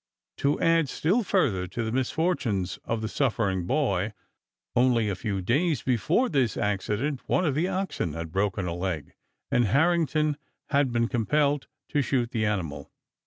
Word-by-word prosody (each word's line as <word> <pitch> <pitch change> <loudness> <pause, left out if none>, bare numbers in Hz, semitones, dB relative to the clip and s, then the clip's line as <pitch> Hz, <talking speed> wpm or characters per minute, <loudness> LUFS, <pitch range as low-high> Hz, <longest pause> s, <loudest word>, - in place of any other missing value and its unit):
To 140 +1 +1
add 165 -3 +3
still 185 - +1
further 125 - +1
to 115 +6 -3
the 110 - -2
misfortunes 125 - 0
of 115 -1 -2
the - - -1
suffering 105 -9 0
boy, 105 -8 0 0.6
only 120 -3 +3
a 100 - -1
few 95 0 -3
days 145 - +1
before 130 - +2
this 130 - +1
accident 105 +7 -1
one 180 - +2
of 150 - +1
the 160 +6 +1
oxen 185 - -2
had 80 0 -5
broken 95 0 0
a 85 - -2
leg 85 -3 -3 0.4
and 120 - +3
Harrington 155 - +2 0.3
had 140 -3 +3
been 115 0 +1
compelled 140 +4 +1 0.2
to 145 - +1
shoot 125 -3 0
the 110 -4 0
animal. 85 -9 -3
120 Hz, 160 wpm, -27 LUFS, 100-150 Hz, 0.6 s, add